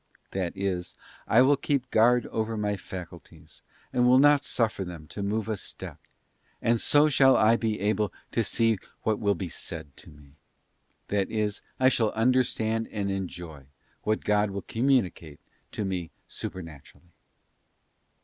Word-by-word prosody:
'* - - -46
That 95 -1 -3
is, 95 -2 -3 0.3
I 120 +3 +6
will 140 +2 +5
keep 140 -2 -1
guard 120 +2 +4
over 110 0 -2
my 105 -1 0
faculties, 90 -2 -10 0.3
and 125 0 +3
will 125 +1 +6
not 145 +1 +5
suffer 110 -7 0
them 85 -4 -8
to 105 - -6
move 105 +1 -1
a 110 - -1
step, 95 - -8 0.6
and 115 0 +1
so 145 +1 +5
shall 135 -2 +5
I 110 +2 +5
be 110 -2 -1
able 105 0 0 0.2
to 115 - +1
see 115 -1 +1 0.2
what 110 -1 +1
will 100 -1 +2
be 90 +1 -4
said 70 -3 -7
to - - -12
me; 75 0 -18 0.7
that 100 -2 0
is, 105 -2 -2 0.2
I 130 0 +6
shall 115 -4 +2
understand 115 -2 +1
and 100 -2 -2
enjoy 85 -7 -6 0.3
what 110 0 -1
God 105 0 +2
will 100 0 -5
communicate 110 - 0 0.3
to 105 - -2
me 90 -3 -3 0.2
supernaturally. 85 0 -9
105 Hz, 155 wpm, -27 LUFS, 95-115 Hz, 0.7 s, I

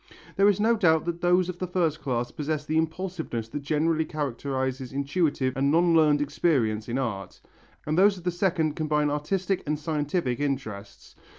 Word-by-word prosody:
There 200 +1 +5
is 205 - +1
no 225 +2 +3
doubt 160 -7 +3
that 170 0 -3
those 180 0 +3
of 180 -1 -6
the 185 - -2
first 170 -4 0
class 120 -3 -2
possess 150 0 -3
the 155 - -2
impulsiveness 160 -8 -3
that 145 - -5
generally 155 +3 +1
characterizes 130 -3 -3
intuitive 140 -1 0
and 140 +1 +1
non 170 +2 +4
learned 150 -2 +4
experience 125 -8 0
in 120 - -1
art, 105 -8 -4 0.5
and 155 - -1
those 195 +2 +4
of 180 - -11
the 180 - 0
second 170 -4 0
combine 150 -1 0
artistic 180 +6 -1
and 150 +1 0
scientific 150 -3 -1
interests. 110 -8 -4
150 Hz, 175 wpm, -26 LUFS, 135-175 Hz, 0.5 s, There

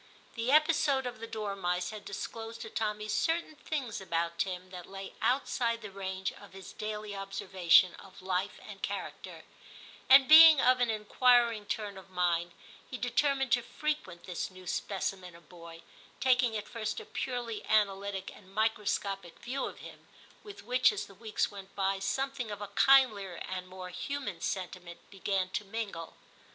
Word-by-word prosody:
The 235 +2 -1
episode 300 -3 +4
of 245 -2 -5
the 230 - -6
dormice 195 -5 -2
had 215 -1 -9
disclosed 225 +3 -6
to 220 -1 -7
Tommy 210 -1 -2
certain 325 +10 0
things 275 -8 -4
about 170 -2 -2
Tim 185 -1 -3
that 180 -2 -9
lay 195 0 -8
outside 235 -3 0
the 210 - -7
range 190 -1 -3
of 205 - -15
his 190 -1 -10
daily 215 -1 -5
observation 190 -2 +3
of 195 - -14
life 190 +2 -1
and - - -10
character, - - -5 0.7
and 265 0 +9
being 315 -1 +10
of 255 0 +4
an 245 -1 +2
inquiring 230 0 +3
turn 205 -3 -3
of 190 - -16
mind, 175 -2 0 0.4
he 255 - -5
determined 270 +2 +1
to 245 - +4
frequent 235 - -4
this 180 -2 -4
new 185 -1 -14
specimen 185 -1 -3
of 170 - -17
boy, 170 -1 -12 0.4
taking 245 -3 +3
at 210 0 -6
first 220 -1 -3
a - - -10
purely 240 -4 -4
analytic 200 -2 +1
and 190 -2 -17
microscopic 200 -4 -1
view 255 +3 -3
of - - -8
him, - - -12 0.3
with 415 -2 -11
which, 250 +3 +4
as 205 0 -4
the 200 - -15
weeks 215 +2 -2
went 195 -1 -11
by, 195 0 0
something 265 +4 -2
of 205 -1 -5
a 205 -1 -6
kindlier 210 -5 +4
and 185 +1 -5
more 185 0 -8
human 205 -1 -4
sentiment 180 -2 -4
began 195 -1 -1
to 210 - -2
mingle. 200 -5 -5
205 Hz, 165 wpm, -31 LUFS, 190-240 Hz, 0.7 s, being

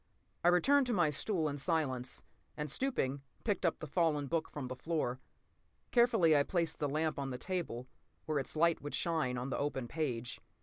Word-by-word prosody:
I - - +4
returned 260 +10 +5
to 245 - +1
my 175 -7 +3
stool 160 +2 0
in 145 -1 -3
silence, 135 -6 -1 0.3
and 150 -2 -2
stooping, 140 - 0 0.2
picked 200 -5 +1
up 165 - 0
the - - -6
fallen 155 -2 +1
book 160 +3 -1
from 140 -4 -5
the 130 - -5
floor. 130 -3 -1 0.7
Carefully 225 -10 +5
I 145 - +6
placed 170 +2 0
the 145 - 0
lamp 155 +1 0
on 135 -1 -2
the 125 - -4
table, 165 -8 -3 0.4
where 155 -2 0
its 135 - -3
light 170 +1 +3
would 145 - -4
shine 155 -7 0
on 125 +2 -3
the - - -1
open 135 -4 -2
page. 125 -5 -3
155 Hz, 190 wpm, -34 LUFS, 135-170 Hz, 0.7 s, I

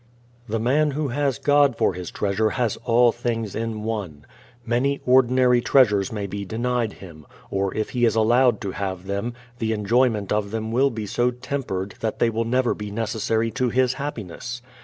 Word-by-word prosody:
The 115 +1 -1
man 140 +7 +2
who 150 -2 -1
has 140 +1 0
God 145 -3 +3
for - - +2
his 90 -1 -6
treasure 105 +2 0
has 120 -2 -1
all 120 0 +5
things 115 -3 -3
in 110 -1 -3
One. 100 -10 -4 0.4
Many 130 +4 +1
ordinary 125 -1 +4
treasures 105 -8 +3
may 105 -2 -3
be 100 +1 -5
denied 115 +2 -1
him, 80 -6 -13 0.2
or 100 0 0
if 110 - -2
he 120 -1 +2
is 115 - +2
allowed 120 0 +3
to 100 - -3
have 95 -2 -4
them, 100 +5 -3 0.2
the 110 -1 0
enjoyment 110 -1 +1
of 105 -1 0
them 110 +1 -3
will 135 +4 +3
be 110 -4 -5
so 120 +4 +1
tempered 125 -7 -4
that 110 -1 -2
they 115 - +2
will 115 +1 -1
never 125 +1 +1
be 105 -1 -6
necessary 110 +1 -1
to 130 0 0
his 125 +1 +2
happiness. 120 - -6
115 Hz, 180 wpm, -23 LUFS, 105-125 Hz, 0.4 s, all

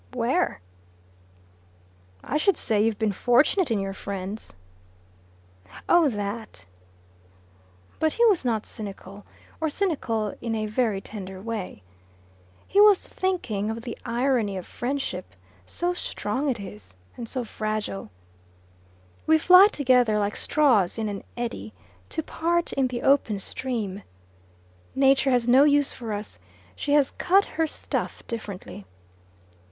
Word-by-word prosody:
"Where?" 255 - 0 1.6
"I 295 - -1
should 390 +6 +2
say 210 -2 +1
you've 225 -2 +1
been 220 -2 +1
fortunate 260 - +3
in 220 -3 +1
your 195 0 -3
friends." 200 +2 -6 1.3
"Oh 345 -4 +5
that!" 205 - -5 1.3
But 315 -1 +2
he 475 - +3
was 405 -9 +4
not 225 -4 0
cynical 200 -2 -8 0.3
or 320 - 0
cynical 255 - -1
in 230 -1 -2
a 215 -1 -1
very 215 -2 0
tender 190 -3 -8
way. 210 - -5 0.8
He 400 - +4
was 415 -2 +6
thinking 235 - -2
of 225 +1 -4
the 240 - -5
irony 235 -5 0
of 185 - -6
friendship 240 - -4 0.3
so 350 +1 -1
strong 275 -4 -2
it 240 -4 -1
is, 105 - -10 0.2
and 230 -2 -7
so 255 -2 -3
fragile. 215 - -4 1.2
We 315 - +6
fly 365 +4 +8
together, 250 - +3
like 205 0 -1
straws 240 -13 +2
in 220 -1 -1
an 200 -1 -5
eddy, 230 - -4 0.4
to 320 - -2
part 340 +2 -1
in 270 -2 +2
the 245 -1 -5
open 260 -7 +3
stream. 210 -3 -4 0.9
Nature 270 0 +4
has 245 -2 +2
no 255 +3 +7
use 290 -1 +3
for 230 -3 -6
us: 205 - -5 0.4
she 285 - -1
has 290 -2 +4
cut 390 +3 +3
her 325 0 -1
stuff - - -4
differently. 200 - -7
235 Hz, 130 wpm, -25 LUFS, 205-285 Hz, 1.6 s, fly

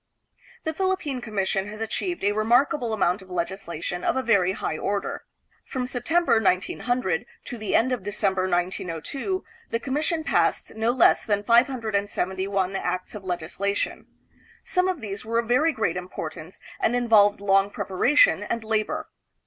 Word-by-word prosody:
The 320 - -2
Philippine 370 -8 -1
Commission 195 -3 -1
has 215 +1 -8
achieved 345 - -3
a 205 - +3
remarkable 235 +3 +2
amount 195 -2 +1
of 190 - -15
legislation 175 -1 -4
of - - +1
a 260 - 0
very 195 -6 +3
high 155 - -3
order. 200 0 -2 0.4
From 255 -2 -3
Sep 245 -1 -5
tember, 330 -9 +3
1900, 190 0 0 0.2
to 245 - -6
the 215 -2 -1
end 255 +3 +3
of 250 -4 -1
December, 195 -2 0
1902, 180 - -2 0.3
the 230 - -1
com 260 +3 -4
mission 315 +2 0
passed - - +1
no 220 +1 0
less 245 +1 +4
than 205 -2 0
571 200 -5 +1
acts 185 -1 -2
of 210 -2 -8
legislation. 185 +3 -2 0.6
Some 365 -1 +1
of 370 -6 -2
these 200 -2 -5
were 230 +1 -1
of 230 -1 0
very 290 +7 +3
great 220 - -1
importance 165 -2 -7 0.2
and 240 - +2
involved 215 -5 +4
long 195 0 +3
preparation 285 - +3
and 230 -1 -3
labor. 220 -1 -1
215 Hz, 155 wpm, -25 LUFS, 190-245 Hz, 0.6 s, less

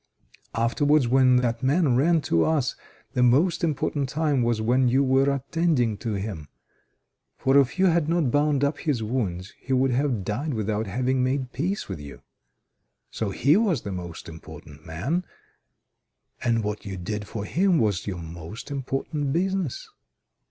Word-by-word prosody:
Afterwards 135 +4 +2
when 130 0 +4
that 120 -1 +1
man 140 0 +2
ran 160 +5 +3
to 85 - +2
us, 150 -6 0 0.4
the 125 - +1
most 150 +9 +3
important 145 -3 -1
time 145 -2 +1
was 120 -2 +1
when 125 +4 +2
you 130 +3 +3
were 135 +1 +3
attending 140 -4 0
to 115 0 -3
him, 95 -7 -5 0.9
for 135 +1 +1
if 135 +3 +1
you 190 - +4
had 170 -3 +2
not 165 -7 +1
bound 145 0 +2
up 145 +1 0
his 135 -8 -1
wounds 100 -6 -3
he 130 - -3
would 130 0 +2
have 125 -5 0
died 130 +8 -2
without 110 0 -2
having 130 +5 0
made 130 0 -1
peace 180 +11 -2
with 95 -6 -6
you. 70 -1 -11 0.9
So 110 - -2
he 140 - +3
was 195 - +1
the 100 - -5
most 90 -2 -7
important 80 -1 -12
man, 130 - -2 1.2
and 115 -2 +1
what 105 0 -3
you 95 -2 -6
did 105 +3 -4
for 105 -1 -5
him 180 - +2
was 105 - 0
your 90 -4 -4
most 85 - -9
important 135 +1 -2
business. 185 -2 -1
130 Hz, 160 wpm, -25 LUFS, 105-145 Hz, 1.2 s, when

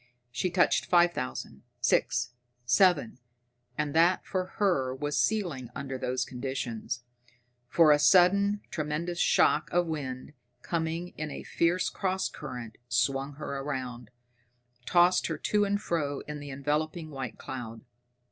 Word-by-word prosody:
She 135 +9 -1
touched 180 0 +2
five 175 -1 +5
thousand, 125 - -5 0.2
six, 120 0 +1 0.3
seven 135 - +3 0.6
and 145 -1 -1
that, 170 +3 +4
for 185 -1 -1
her, 135 -11 +1
was 145 +2 -3
ceiling 170 - 0
under 135 -1 -4
those 130 0 -1
conditions, 125 -2 -4 0.6
for 155 +4 +5
a 145 - +5
sudden 200 +6 +5
tremendous 160 +3 -3
shock 155 +2 +3
of 175 0 +2
wind, 140 -4 -5 0.3
coming 165 +1 -2
in 155 0 -3
a - - -7
fierce 175 +2 +1
cross 190 -1 -1
current, 125 -7 -8
swung 135 +3 0
her 140 -1 -5
round, 125 -5 -5 0.8
tossed 175 +3 +4
her - - -3
to 210 -1 +1
and 205 0 0
fro 145 -4 -1
in 150 0 -7
the 145 0 -8
enveloping 155 +4 -2
white 135 -4 -6
cloud. 115 -3 -7
150 Hz, 135 wpm, -29 LUFS, 130-175 Hz, 0.8 s, five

